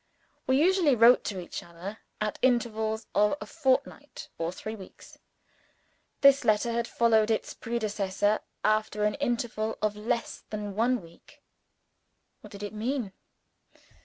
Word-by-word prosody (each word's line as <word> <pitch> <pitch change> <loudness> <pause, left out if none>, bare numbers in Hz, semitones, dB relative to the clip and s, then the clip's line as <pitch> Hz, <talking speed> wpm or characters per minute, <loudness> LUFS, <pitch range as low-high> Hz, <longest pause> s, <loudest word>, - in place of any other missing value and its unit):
We 260 +1 +3
usually 345 -4 +4
wrote 235 +2 +6
to 195 -3 -3
each 175 - -6
other 175 +5 -9 0.2
at 210 0 -2
intervals 220 -3 +1
of 210 +5 +3
a - - -6
fortnight 280 -1 -1
or 165 0 -1
three 215 +4 -6
weeks. 195 -3 -14 1.0
This 275 0 +6
letter 215 +2 +2
had 235 0 -1
followed 225 -2 +3
its 220 - -1
predecessor 210 -3 -1 0.2
after 215 0 +1
an 210 - +2
interval 240 -5 -2
of 215 -1 0
less 230 +3 -3
than 210 -1 -4
one 235 +1 +1
week. 165 0 -18 1.0
What - - -13
did 200 -1 -9
it 205 - -5
mean? 225 -1 -2
220 Hz, 135 wpm, -28 LUFS, 210-245 Hz, 1.0 s, wrote